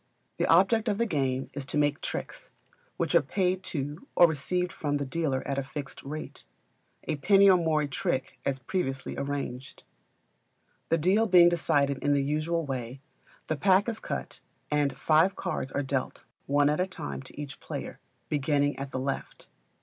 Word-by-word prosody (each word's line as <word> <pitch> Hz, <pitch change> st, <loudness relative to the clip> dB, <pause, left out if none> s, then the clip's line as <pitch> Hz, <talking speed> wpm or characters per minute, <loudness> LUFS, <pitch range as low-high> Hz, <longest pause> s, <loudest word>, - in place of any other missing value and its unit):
The -, -, +1 dB
object 195 Hz, +7 st, +4 dB
of 205 Hz, -, 0 dB
the 235 Hz, -, +2 dB
game 135 Hz, -, -1 dB
is 140 Hz, -, -4 dB
to -, -, -2 dB
make 145 Hz, 0 st, +1 dB
tricks, -, -, -5 dB, 0.5 s
which -, -, -1 dB
are -, -, +6 dB
paid 185 Hz, -1 st, 0 dB
to 145 Hz, -, -4 dB
or 175 Hz, -, +8 dB
received 180 Hz, +3 st, -1 dB
from 145 Hz, -1 st, -1 dB
the 140 Hz, -, -3 dB
dealer 135 Hz, -2 st, -1 dB
at 140 Hz, 0 st, -1 dB
a -, -, -2 dB
fixed 140 Hz, +1 st, -7 dB
rate, 155 Hz, +3 st, -7 dB, 0.6 s
a 155 Hz, -, -2 dB
penny 195 Hz, +6 st, +5 dB
or -, -, +6 dB
more 160 Hz, -3 st, +1 dB
a -, -, -2 dB
trick, 135 Hz, -1 st, -2 dB
as 135 Hz, -1 st, 0 dB
previously 135 Hz, -1 st, -3 dB
arranged. 140 Hz, -2 st, -5 dB, 1.1 s
The 165 Hz, -, +3 dB
deal 195 Hz, +8 st, +3 dB
being 175 Hz, -3 st, +7 dB
decided 145 Hz, -5 st, +1 dB
in 145 Hz, -, +3 dB
the 140 Hz, -, +2 dB
usual 155 Hz, +3 st, -1 dB
way, 130 Hz, -1 st, -5 dB, 0.5 s
the 155 Hz, -, -1 dB
pack 190 Hz, +5 st, +3 dB
is 225 Hz, -1 st, -2 dB
cut -, -, -5 dB, 0.3 s
and 145 Hz, -1 st, +1 dB
five 160 Hz, +5 st, +3 dB
cards 155 Hz, -7 st, -3 dB
are 145 Hz, -, -1 dB
dealt 135 Hz, -1 st, -3 dB, 0.2 s
one 145 Hz, +1 st, +3 dB
at 150 Hz, -, -1 dB
a 185 Hz, -, +1 dB
time 70 Hz, -, -6 dB
to -, -, -12 dB
each 145 Hz, -2 st, -7 dB
player, -, -, -6 dB, 0.3 s
beginning 145 Hz, 0 st, +1 dB
at 135 Hz, 0 st, -4 dB
the 130 Hz, -, -3 dB
left. 135 Hz, +1 st, -5 dB
145 Hz, 180 wpm, -28 LUFS, 140-175 Hz, 1.1 s, or